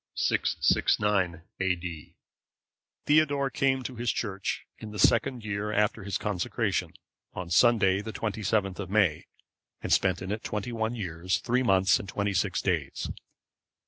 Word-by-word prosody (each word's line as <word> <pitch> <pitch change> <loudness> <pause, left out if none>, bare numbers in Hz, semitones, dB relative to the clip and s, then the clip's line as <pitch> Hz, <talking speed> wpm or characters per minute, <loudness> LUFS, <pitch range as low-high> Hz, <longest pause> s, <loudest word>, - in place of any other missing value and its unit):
[669 95 -5 +1 0.2
A.D.] 90 -4 -3 0.9
Theodore 145 -2 +3
came 130 -1 +1
to 125 -1 -6
his 120 0 0
Church 100 -4 -3
in 110 - -8
the 105 - -8
second 115 +3 +2
year 105 0 -2
after 105 -1 +1
his 100 -1 -2
consecration, 105 -5 -1 0.4
on 90 -2 -6
Sunday, 100 -1 +4
the 110 - -6
27th 105 -3 -1
of 95 -3 -5
May, 95 -7 +2 0.5
and - - 0
spent 95 -1 +2
in 95 - -4
it 110 +2 -3
twenty 105 +3 -3
one 115 0 -2
years, 90 -4 -2
three 125 +2 0
months, 95 -5 +4
and 100 - -8
twenty 100 +1 -1
six 90 - 0
days. - - -1
105 Hz, 145 wpm, -28 LUFS, 95-115 Hz, 0.9 s, Sunday